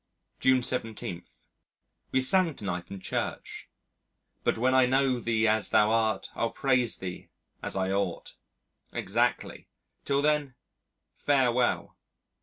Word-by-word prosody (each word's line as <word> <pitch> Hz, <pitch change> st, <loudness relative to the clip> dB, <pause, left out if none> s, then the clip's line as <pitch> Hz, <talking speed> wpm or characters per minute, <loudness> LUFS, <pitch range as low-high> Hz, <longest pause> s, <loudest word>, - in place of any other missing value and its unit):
July 130 Hz, -1 st, +4 dB
17. 115 Hz, -8 st, -2 dB, 0.9 s
We 130 Hz, -, +2 dB
sang 165 Hz, +4 st, +3 dB
to 105 Hz, -, -7 dB
night 90 Hz, -2 st, -4 dB
in 100 Hz, -, -7 dB
Church, 95 Hz, -, -5 dB, 0.7 s
"But -, -, +1 dB
when 130 Hz, +3 st, +2 dB
I 130 Hz, -1 st, +5 dB
know 130 Hz, -1 st, +2 dB
Thee 115 Hz, -1 st, +1 dB
as 110 Hz, 0 st, +2 dB
Thou 105 Hz, +1 st, +4 dB
art, 110 Hz, -3 st, 0 dB
I'll 115 Hz, -, -1 dB
praise 125 Hz, -3 st, +1 dB
Thee 90 Hz, -1 st, -7 dB, 0.3 s
as -, -, -6 dB
I 95 Hz, 0 st, 0 dB
ought." 95 Hz, -3 st, -2 dB, 0.6 s
Exactly! -, -, -1 dB, 0.4 s
Till 140 Hz, 0 st, 0 dB
then, 150 Hz, -3 st, +1 dB, 0.6 s
farewell. 125 Hz, -3 st, +1 dB
120 Hz, 125 wpm, -28 LUFS, 105-130 Hz, 0.9 s, I